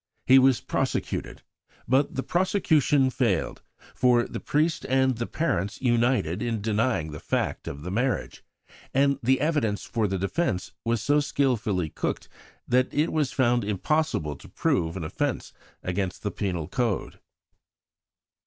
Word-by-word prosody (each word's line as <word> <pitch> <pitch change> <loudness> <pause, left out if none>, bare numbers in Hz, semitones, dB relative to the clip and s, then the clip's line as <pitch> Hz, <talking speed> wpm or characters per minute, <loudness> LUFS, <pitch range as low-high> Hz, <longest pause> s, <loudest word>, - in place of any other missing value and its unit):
He 130 +1 +7
was 130 -2 +4
prosecuted, - - -2 0.4
but 135 +3 +2
the 135 - -1
prosecution 155 -7 +2
failed, 115 - 0 0.3
for 120 -1 +3
the - - -5
priest 155 +2 0
and 130 0 +3
the 120 +1 -3
parents 100 - -1
united 120 -8 +1
in 115 -2 -1
denying 105 -6 0
the 75 - -7
fact - - -2
of 70 +1 -6
the 90 - -5
marriage; 125 +6 -1 0.5
and 140 0 +3
the 130 +2 +3
evidence 145 -9 0
for 110 -2 0
the 95 0 -1
defence 100 - -1
was 115 -2 0
so 145 +1 +3
skilfully 115 - 0
cooked - - -3 0.4
that 125 +1 +2
it 150 +2 0
was 150 -4 +1
found 120 -3 +2
impossible 100 - 0
to - - -14
prove 80 +2 0
an 90 - -4
offence 75 - -3 0.3
against 90 0 -3
the 105 - -1
Penal 90 -6 -3
Code. 110 +2 -2
120 Hz, 145 wpm, -26 LUFS, 100-135 Hz, 0.5 s, He